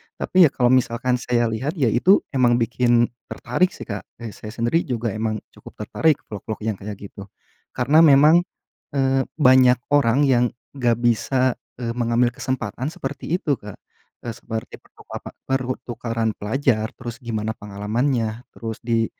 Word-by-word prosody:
Tapi 185 -3 +4
ya - - -4
kalau 125 -1 +3
misalkan 125 0 +1
saya 120 -2 0
lihat 130 - -3
ya 130 -9 +2
itu, 185 - +4
emang 125 -3 +3
bikin 120 0 +2 0.2
tertarik 180 +10 -1
sih - - -8
Kak, 105 -2 -6
kayak 115 -2 -8
saya 110 +1 -8
sendiri 120 +9 0
juga 120 -3 -2
emang 110 +1 -3
cukup - - -15
tertarik 155 -3 +1
vlog 105 - -8
vlog 110 -1 -5
yang 110 -3 -2
kayak 105 +1 -6 0.2
gitu. 100 -1 -10 0.5
Karena 135 +5 +4
memang, 155 +1 +7 0.6
eee, 135 -1 +1
banyak 130 -4 +5
orang 140 -1 +4
yang 125 -3 +4 0.3
nggak 120 -4 +2
bisa, 125 +2 +1 0.2
eee, 120 -1 -4
mengambil 120 0 +1
kesempatan 125 -1 -4
seperti 145 -3 -6
itu 145 -7 -1
Kak. 105 -2 -9 0.5
E 120 - -3
seperti 110 0 -7
pertukapa - - -10 0.2
pertukaran 120 -3 -2
pelajar, 110 0 0
terus 120 +1 -8
gimana 110 -2 -3
pengalamannya, 110 +3 -2
terus 115 -2 -7
di 115 -1 +1
120 Hz, 155 wpm, -22 LUFS, 115-130 Hz, 0.6 s, memang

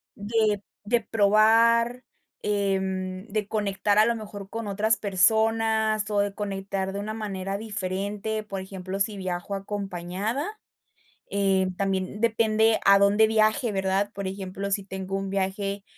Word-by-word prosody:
de 210 -1 0 0.2
de 235 +2 +2
probar, 230 +3 +4 0.4
em, 190 -1 -1
de 210 -1 -2
conectar 205 -1 0
a 215 - +7
lo 235 - +1
mejor 205 -3 -8
con 225 -2 -5
otras 215 +3 +2
personas, 220 +2 +2
o 205 -1 +1
de 200 0 0
conectar 195 -1 -3
de 200 - -3
una 215 +1 -4
manera 195 -3 -4
diferente. 205 +1 -3
Por 195 -2 -5
ejemplo, 190 0 -6
si 205 0 0
viajo 185 +1 -3
acompañada, 200 - -4 0.7
eh, 195 -2 +2
también 195 +1 -2
depende 225 -1 +3
a 200 0 +8
dónde 205 +2 +5
viaje, 220 +2 +2
¿verdad? 195 +1 0
Por 200 0 -5
ejemplo, 195 +1 -5
si 200 0 0
tengo 190 0 -4
un 195 0 -4
viaje 195 +1 -2
200 Hz, 140 wpm, -26 LUFS, 195-220 Hz, 0.7 s, a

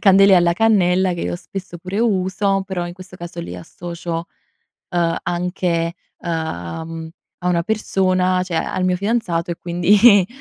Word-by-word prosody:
candele 195 0 +7
alla 175 -1 +4
cannella, 185 -3 +3
che 170 - -5
io - - -2
spesso 180 -1 -8
pure 185 +4 -4
uso, 195 -2 +1
però 185 -3 -3
in 175 - -6
questo 185 0 -12
caso 175 - -7
lì 85 +1 -7
associo, 170 - -6 0.6
uhm, 170 -2 +1
anche, 175 -1 -1 0.2
uhm, 160 - -4
cioè - - -27 0.3
a 180 - 0
una 170 -1 +2
persona 185 -3 +1
cioè 180 -2 -5
al 185 +3 -1
mio 180 0 +2
fidanzato 195 -5 -1
e 170 - -2
quindi, 195 +3 +5
180 Hz, 155 wpm, -20 LUFS, 170-190 Hz, 0.6 s, candele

